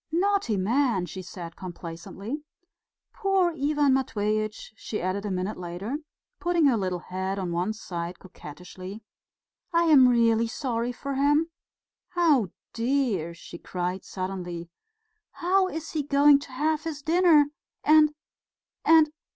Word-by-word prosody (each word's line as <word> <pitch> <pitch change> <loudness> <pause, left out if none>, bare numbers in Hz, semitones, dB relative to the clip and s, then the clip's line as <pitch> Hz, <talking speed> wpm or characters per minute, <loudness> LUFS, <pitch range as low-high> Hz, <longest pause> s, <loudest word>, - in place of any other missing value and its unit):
"Naughty 360 - +1
man!" 225 -1 +1
she 190 +1 -7
said 175 -2 -8
complacently. 185 - -7 0.7
"Poor 390 -4 +2
Ivan 290 -2 +2
Matveitch," 215 -4 -1
she 215 - -5
added 190 +3 -2
a - - -2
minute 185 +2 -2
later, 180 - -4 0.4
putting 345 -2 +2
her 270 -4 +5
little 185 -4 -1
head 190 +2 -4
on 185 -3 -3
one 175 +5 0
side 175 -5 -5
coquettishly. 185 +4 -10 0.7
"I 335 0 +3
am 290 -6 +7
really 230 -1 +3
sorry 240 -1 -2
for 275 +3 -5
him. 295 +4 +2 0.6
Oh, 300 - +3 0.2
dear!" 230 - 0
she 170 0 -11
cried 180 +1 -3
suddenly, 180 -3 -5 0.6
"how 375 +2 +2
is 320 -3 -6
he 310 - -1
going 285 0 +5
to 280 - -11
have 305 +4 0
his 300 -3 -5
dinner... 320 -3 +4 0.3
and... 305 0 +6 0.7
and 315 -1 +6
230 Hz, 130 wpm, -26 LUFS, 185-300 Hz, 0.7 s, am